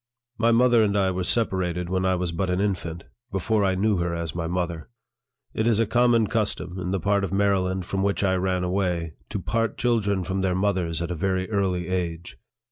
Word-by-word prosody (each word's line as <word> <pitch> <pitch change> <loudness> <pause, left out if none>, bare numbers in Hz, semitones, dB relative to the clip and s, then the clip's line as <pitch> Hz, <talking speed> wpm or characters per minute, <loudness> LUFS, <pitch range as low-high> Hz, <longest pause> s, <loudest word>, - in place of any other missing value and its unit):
My 115 0 +4
mother 120 0 +5
and 100 -1 +1
I 95 -1 +2
were 90 0 -2
separated 90 -5 0
when 95 +1 0
I 95 0 +2
was 90 -1 -2
but 90 +3 -2
an 90 0 0
infant 85 -4 -2 0.3
before 100 +3 +1
I 95 -1 +2
knew 105 +1 +2
her 85 -1 -1
as 85 -2 -4
my 85 -1 -3
mother. 85 -1 -3 0.6
It 110 - 0
is 115 -2 +3
a 115 - +3
common 120 0 +3
custom, 100 -4 -2
in 90 0 -3
the 95 +1 0
part 100 +2 +1
of 95 - -2
Maryland 95 -2 +1
from 95 +1 -2
which 100 +1 0
I 95 -1 +2
ran 90 0 0
away, 90 -3 -1 0.2
to - - -3
part 115 -1 -1
children 105 -6 +1
from 95 +2 -2
their 95 -1 +1
mothers 90 -4 0
at 85 - -3
a - - -2
very 95 +1 -1
early 95 -4 0
age. 85 -2 -3
95 Hz, 210 wpm, -25 LUFS, 90-100 Hz, 0.6 s, mother